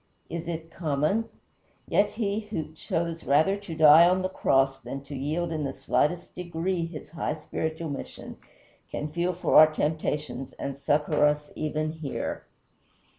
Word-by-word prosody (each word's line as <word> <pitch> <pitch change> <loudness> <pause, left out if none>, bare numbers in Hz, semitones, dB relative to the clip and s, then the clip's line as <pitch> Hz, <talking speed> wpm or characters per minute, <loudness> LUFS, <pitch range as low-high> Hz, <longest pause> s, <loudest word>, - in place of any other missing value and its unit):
is 170 0 -4
it 165 -1 -5
common? 155 +7 0 0.6
Yet 205 +1 +2
he 210 -2 -1
who 160 -6 -4
chose 165 +1 -3
rather 160 +8 +3
to 200 -5 -8
die 160 +2 +8
on 185 +1 +1
the 185 - 0
cross 135 -6 +2
than 135 +2 -6
to 140 0 -8
yield 155 +6 -2
in 155 -2 -2
the 135 -1 -2
slightest 150 +5 0
degree 175 0 -2
his 155 -3 -9
high 160 -2 -2
spiritual 160 +1 -4
mission 140 - -7 0.5
can 150 0 -4
feel 175 +3 0
for 180 - +3
our 155 0 +8
temptations 150 -4 -2
and 140 -1 -4
succor 150 +2 +1
us 150 0 -1
even 155 0 -2
here. 155 -3 -5
155 Hz, 155 wpm, -27 LUFS, 150-170 Hz, 0.6 s, die